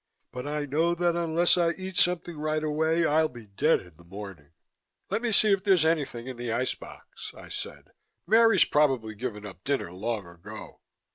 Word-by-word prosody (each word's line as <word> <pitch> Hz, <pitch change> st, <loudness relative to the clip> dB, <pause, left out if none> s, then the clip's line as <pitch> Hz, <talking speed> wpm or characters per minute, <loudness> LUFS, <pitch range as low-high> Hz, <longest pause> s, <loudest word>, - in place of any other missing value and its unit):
But 125 Hz, +2 st, -6 dB
I 150 Hz, 0 st, -2 dB
know 160 Hz, +5 st, +1 dB
that 175 Hz, 0 st, +1 dB
unless 170 Hz, +1 st, +2 dB
I 170 Hz, -1 st, +2 dB
eat 190 Hz, -1 st, -7 dB
something 175 Hz, -1 st, +2 dB
right 155 Hz, 0 st, -1 dB
away 160 Hz, +2 st, +1 dB
I'll 155 Hz, +1 st, +3 dB
be 120 Hz, -3 st, -12 dB
dead 105 Hz, +11 st, +1 dB
in 90 Hz, -4 st, -18 dB
the 85 Hz, -, -17 dB
morning." 95 Hz, -4 st, -10 dB, 0.6 s
"Let's 225 Hz, -1 st, +2 dB
see 215 Hz, -, +4 dB
if 195 Hz, -1 st, +2 dB
there's 190 Hz, -6 st, +4 dB
anything 145 Hz, -7 st, 0 dB
in 130 Hz, -2 st, -7 dB
the 120 Hz, -1 st, -4 dB
ice 125 Hz, +3 st, 0 dB
box," -, -, -11 dB
I -, -, -12 dB
said. -, -, -7 dB, 0.3 s
"Mary's 225 Hz, -1 st, +5 dB
probably 135 Hz, -7 st, +1 dB
given 105 Hz, -2 st, -6 dB
up 95 Hz, -2 st, -11 dB
dinner 140 Hz, -11 st, -1 dB
long 105 Hz, +2 st, -3 dB
ago." 85 Hz, +5 st, -11 dB
150 Hz, 185 wpm, -27 LUFS, 110-170 Hz, 0.6 s, Mary's